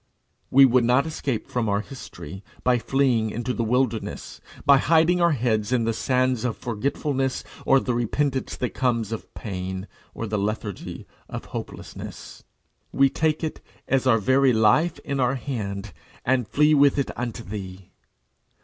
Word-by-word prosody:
We 135 +1 +8
would 125 -1 +4
not 125 +4 +3
escape 140 -7 -3
from 120 -3 -1
our 100 0 +1
history 95 - -10 0.2
by 125 -1 +3
fleeing 125 -4 +1
into 120 +4 -3
the 115 - -1
wilderness, 115 -1 -1 0.2
by 140 -1 +7
hiding 165 +4 +3
our 170 -2 +4
heads 110 -4 0
in 125 -2 +2
the 115 0 0
sands 130 0 +1
of 125 -3 -1
forgetfulness, 135 +3 -2 0.2
or 135 - +6
the 125 - -2
repentance 130 +3 -1
that 125 - -2
comes 115 -5 0
of 115 - -6
pain, 95 -1 -5 0.3
or 115 - -4
the 105 -1 -1
lethargy 105 -1 -4 0.2
of - - -6
hopelessness. - - -8 0.5
We 135 0 +4
take 155 0 0
it, 160 - -3 0.3
as 130 -1 +1
our 115 -3 +5
very 130 +4 +3
life, 135 +10 +3
in 140 -1 -2
our 130 +1 +2
hand, 105 -7 -4 0.3
and 125 -2 +2
flee 150 +4 +4
with 140 -1 +5
it 140 - 0
unto 120 -1 -4
thee. 95 -3 -8
125 Hz, 160 wpm, -24 LUFS, 110-135 Hz, 0.5 s, We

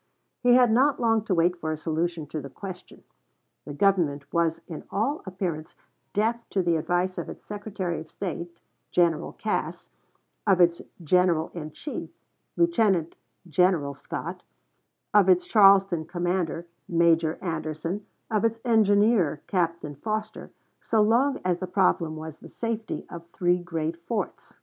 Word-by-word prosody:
He 245 -1 +5
had 250 -2 +5
not 265 +5 +3
long 225 -2 +2
to 195 - +1
wait 175 +1 +3
for 160 -1 -2
a 155 - -2
solution 160 0 -2
of 155 - -2
the 140 - -8
question. 185 +4 -9 0.6
The 145 - -6
Government 160 -6 +2
was 165 -1 +1
in 160 -4 -7
all 270 +9 -1
appearance 175 -5 -4 0.4
deaf 230 +3 -1
to 190 - 0
the 170 -1 +2
advice 175 +3 0
of - - -5
its - - -10
Secretary 200 -4 -4
of 160 - -10
State, 175 -2 -5 0.3
General 170 -2 +1
Cass, - - -3 0.6
of 190 -2 +4
its 170 -1 +4 0.2
General 170 -1 +2
in 155 -3 -6
Chief, 285 - -6 0.5
Lieutenant 215 - +2 0.3
General 170 -3 +2
Scott, - - -6 0.7
of 200 -2 +5
its 180 -1 +4
Charleston 195 -5 +5
Commander, 175 -1 -2 0.2
Major 165 -1 +3
Anderson, 165 +3 -4 0.2
of 215 -1 +1
its 230 0 +1
engineer, 210 -7 +3
Captain 170 -5 -1
Foster, 215 +7 -4 0.3
so 225 - 0
long 255 +6 +3
as 180 -1 +1
the 185 - -4
problem 175 -4 +1
was 155 0 -8
the - - -12
safety 230 -1 -4
of 170 -1 -10
three 175 +1 +1
great 165 -1 -4
forts. 230 -3 -4
180 Hz, 145 wpm, -26 LUFS, 165-210 Hz, 0.7 s, He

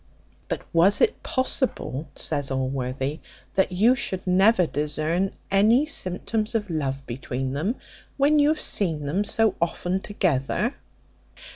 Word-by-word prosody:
"But - - -3
was 175 +5 +4
it 455 - +2
possible," 255 - -1
says 145 -1 -1
Allworthy, 130 +2 -2 0.3
"that 190 -1 +2
you 215 +7 +4
should 190 -7 -3
never 190 +2 +4
discern 155 +5 -1 0.2
any 220 +8 +4
symptoms 215 - -2
of 205 -4 -1
love 135 -3 -2
between 130 +1 -4
them, 175 - -1 0.4
when 290 +2 +4
you 290 - +5
have 310 0 +1
seen 160 - +1
them 175 +9 0
so 220 0 +2
often 180 +2 -1
together?" 185 - 0
180 Hz, 130 wpm, -25 LUFS, 145-215 Hz, 0.4 s, you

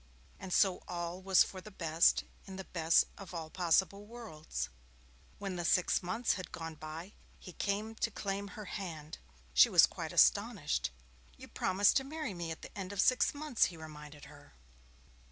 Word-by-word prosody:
And 190 -1 -7
so 190 -1 +3
all 175 +1 -4
was 190 -1 +5
for 185 - -8
the 215 - -10
best 165 -4 +3 0.2
in 190 - -8
the 190 - -6
best 165 -3 +3
of 185 -3 -9
all 160 -2 -5
possible 190 +3 +1
worlds. 160 - -6 0.7
When 195 -3 -4
the 175 - -2
six 180 +1 +3
months 225 +7 0
had 185 - -6
gone 165 -1 -6
by, 160 +5 -8 0.2
he 180 - -11
came 210 +4 -2
to 225 - -1
claim 200 -1 -3
her 210 +1 -9
hand. 160 -6 -6 0.3
She - - +7
was - - +8
quite - - -6
astonished. - - +3 0.5
'You - - -11
promised 195 +2 +3
to 270 - +1
marry 300 -4 -4
me 170 -2 -5
at 160 - -7
the - - -10
end 195 -1 -5
of 200 - -6
six 255 +6 +3
months,' 290 -5 +2
he 170 - -5
reminded 150 -2 -10
her. - - -16
185 Hz, 175 wpm, -33 LUFS, 165-200 Hz, 0.7 s, was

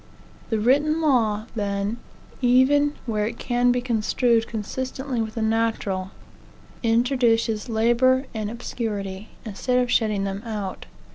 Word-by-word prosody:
The 225 - +1
written 290 +8 +3
law, 225 -9 +2
then, 200 +1 -1 0.4
even 275 +4 +4
where 215 -3 0
it 230 +1 -6
can 245 0 +2
be 245 0 +1
construed 235 0 +1
consistently 255 +3 -3
with 220 -1 -4
the 225 - -1
natural, 220 -4 0 0.7
introduces 230 -2 +2
labor 240 +4 +3
and 215 -2 -3
obscurity, 210 -4 -5 0.2
instead 240 +4 -1
of 250 -1 +1
shutting 215 -3 +2
them 195 0 -3
out. 210 -5 -5
230 Hz, 125 wpm, -24 LUFS, 215-250 Hz, 0.7 s, even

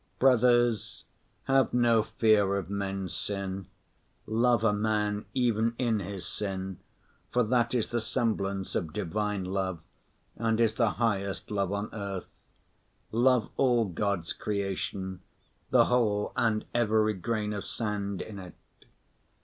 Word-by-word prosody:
Brothers, 120 -3 +3 0.4
have 135 -2 +2
no 120 -2 +4
fear 110 -3 +3
of 95 -1 -5
men's 95 -3 -3
sin. 95 0 -4 0.6
Love 115 +1 +2
a 110 -2 +4
man 105 0 0
even 115 -2 +2
in 115 -4 +1
his 95 -2 -5
sin, 95 -2 -4 0.5
for 125 - +3
that 120 +2 +1
is 115 - 0
the 120 -1 -1
semblance 100 -4 -1
of 80 -3 -2
Divine 105 0 -2
Love 95 -2 -2 0.6
and 115 -1 0
is 115 -2 +3
the 115 -2 +2
highest 100 -5 -1
love 100 -2 0
on 100 +1 -2
earth. 100 -3 -4 0.9
Love 120 0 +3
all 120 -4 +3
God's 95 -1 -2
creation, 95 -2 -3 0.5
the - - +5
whole 110 -4 +1
and 110 -2 +1
every 110 -2 +3
grain 105 +2 -2
of 100 - -4
sand 100 -3 -3
in 100 -2 -8
it. 90 -4 -10
105 Hz, 130 wpm, -29 LUFS, 100-115 Hz, 0.9 s, the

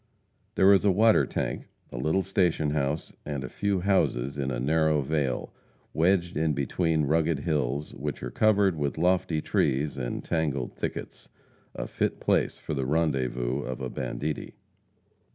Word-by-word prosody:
There 95 +1 +6
is 95 - +4
a 105 - +4
water 110 +4 +4
tank, - - -3 0.2
a - - -6
little 80 +9 +1
station 90 -6 +1
house, 75 +1 -2
and 70 -2 -4
a 65 - -5
few 100 -2 -1
houses 70 -9 +1
in 70 -2 -2
a - - -2
narrow 80 +2 +2
vale, 70 -3 -1 0.4
wedged 85 +1 +2
in 80 0 +1
between 80 +3 0
rugged 80 0 +1
hills, 75 -2 -1
which 75 +1 -5
are - - -4
covered 100 -4 +3
with 75 -1 -2
lofty 90 -2 +1
trees 70 +1 0
and - - -4
tangled 75 -6 -1
thickets, - - -6 0.5
a - - -3
fit - - -2
place - - +1
for - - -5
the 65 -3 -2
rendezvous 65 -5 0
of 65 -2 -5
a 65 -2 -4
banditti. 75 0 -4
75 Hz, 155 wpm, -27 LUFS, 70-85 Hz, 0.5 s, There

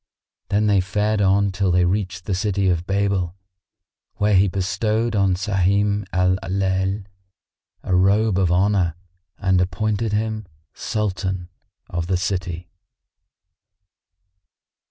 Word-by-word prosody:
Then 105 +1 +2
they 100 -2 +3
fared 105 +2 0
on 100 +1 +3
till 95 0 0
they 90 0 +3
reached 90 -1 -2
the 100 - -2
city 100 0 0
of 85 -1 -1
Babel, 95 -3 0 0.8
where 105 0 +1
he 95 +1 +5
bestowed 105 +5 -1
on 95 -2 +3
Sahim 100 +1 +1
Al 90 0 +2
Layl 95 +1 -1 0.8
a 95 - 0
robe 100 +2 +3
of 90 -3 +2
honour 90 -2 +2 0.4
and 95 -2 +2
appointed 105 +4 -1
him 110 -1 -2 0.3
Sultan 95 -4 -3 0.4
of 85 -1 -3
the 95 0 +1
city. 90 -2 -3
95 Hz, 115 wpm, -22 LUFS, 90-105 Hz, 0.8 s, he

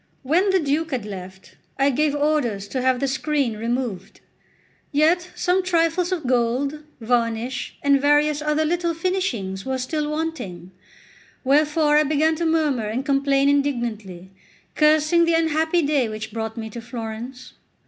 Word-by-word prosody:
When 340 +9 +2
the 380 0 +3
Duke 310 +1 0
had 255 -7 -3
left, 190 -2 -10 0.2
I 275 +1 +3
gave 295 +2 +1
orders 285 -9 0
to 260 - -2
have 255 0 +2
the 275 - 0
screen 275 -3 -1
removed. 225 -3 -4 0.7
Yet 335 +5 +2
some 360 +1 +1
trifles 345 0 +1
of 340 -6 -2
gold, 255 +4 0 0.2
varnish, 235 +1 -1
and 280 -1 +4
various 295 +1 +3
other 300 +1 +1
little 340 +1 0
finishings 315 - -2
were 265 0 -2
still 295 +4 -2
wanting; 300 - -4 0.7
wherefore 300 +2 +3
I 305 - +5
began 310 +2 +2
to 335 0 0
murmur 300 -8 +1
and 240 +6 -3
complain 275 -1 +2
indignantly, 235 -10 -1 0.4
cursing 310 +2 +4
the 335 0 +2
unhappy 320 +1 +1
day 285 -5 +1
which 215 0 -6
brought 225 0 -4
me 220 -1 -6
to 235 - -7
Florence. 240 +2 -7
280 Hz, 150 wpm, -22 LUFS, 235-310 Hz, 0.7 s, I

